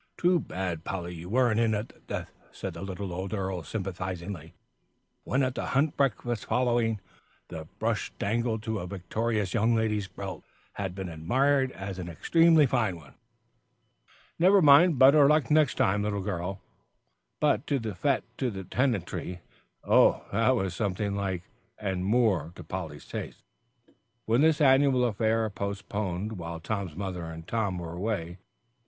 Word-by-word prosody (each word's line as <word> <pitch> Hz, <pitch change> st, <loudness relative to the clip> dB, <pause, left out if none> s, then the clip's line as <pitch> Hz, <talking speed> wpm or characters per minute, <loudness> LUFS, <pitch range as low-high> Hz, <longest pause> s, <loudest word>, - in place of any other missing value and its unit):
"Too 180 Hz, 0 st, +3 dB
bad, 90 Hz, -, -4 dB
Polly, 90 Hz, -2 st, -4 dB
you 85 Hz, +1 st, -8 dB
weren't 120 Hz, -1 st, +3 dB
in 115 Hz, -2 st, +2 dB
at 105 Hz, +3 st, -3 dB
the -, -, -20 dB
death," -, -, -6 dB, 0.2 s
said -, -, -6 dB
the -, -, -8 dB
little 95 Hz, -1 st, -5 dB
old 95 Hz, +4 st, -3 dB
earl, 95 Hz, -2 st, -2 dB
sympathisingly, 95 Hz, -2 st, -5 dB, 0.7 s
when 135 Hz, +2 st, +1 dB
at 130 Hz, -1 st, 0 dB
the -, -, -4 dB
hunt 145 Hz, +2 st, +2 dB
breakfast 120 Hz, -4 st, 0 dB
following, 120 Hz, -3 st, +1 dB, 0.5 s
the 80 Hz, -1 st, -7 dB
brush 110 Hz, -2 st, -1 dB
dangling 110 Hz, +1 st, -1 dB
to 110 Hz, -1 st, -3 dB
a 90 Hz, -, -5 dB
victorious 100 Hz, +2 st, -2 dB
young 115 Hz, +1 st, +3 dB
lady's 105 Hz, -3 st, 0 dB
belt, 95 Hz, -2 st, -7 dB, 0.3 s
had 95 Hz, -3 st, -4 dB
been 95 Hz, -1 st, -4 dB
admired 130 Hz, -, +1 dB
as 95 Hz, -1 st, -6 dB
an 85 Hz, -1 st, -5 dB
extremely 165 Hz, -, +4 dB
fine 120 Hz, -8 st, +1 dB
one. 75 Hz, -5 st, -14 dB, 1.3 s
"Never 190 Hz, +4 st, +6 dB
mind; 155 Hz, 0 st, +7 dB
better 140 Hz, +2 st, +7 dB
luck 150 Hz, +1 st, +3 dB
next 155 Hz, -1 st, +4 dB
time, 100 Hz, +1 st, +2 dB
little 105 Hz, -1 st, -1 dB
girl." 95 Hz, 0 st, -3 dB, 0.8 s
But 110 Hz, -, +2 dB
the 145 Hz, -, +1 dB
fête 115 Hz, +4 st, -1 dB, 0.2 s
to 130 Hz, -, +1 dB
the 95 Hz, -3 st, -6 dB
tenantry, 95 Hz, -5 st, -2 dB, 0.4 s
oh! -, -, +4 dB
that 115 Hz, +5 st, +3 dB
was 95 Hz, -6 st, -1 dB
something 100 Hz, +1 st, -1 dB
like, 95 Hz, -3 st, -2 dB, 0.3 s
and 95 Hz, -3 st, -2 dB
more 100 Hz, -7 st, +2 dB
to 90 Hz, -, -9 dB
Polly's 80 Hz, -3 st, -6 dB
taste, -, -, -7 dB, 0.8 s
when 115 Hz, +4 st, +3 dB
this 160 Hz, 0 st, +4 dB
annual 135 Hz, -2 st, +5 dB
affair, 110 Hz, 0 st, +1 dB
postponed 100 Hz, 0 st, -4 dB
while 85 Hz, 0 st, -5 dB
Tom's 95 Hz, -2 st, -4 dB
mother 95 Hz, -2 st, -4 dB
and 80 Hz, 0 st, -8 dB
Tom 100 Hz, -5 st, -1 dB
were 85 Hz, -1 st, -6 dB
away, 95 Hz, -1 st, -2 dB
took 85 Hz, +3 st, -11 dB
place. -, -, -40 dB
100 Hz, 160 wpm, -28 LUFS, 90-120 Hz, 1.3 s, mind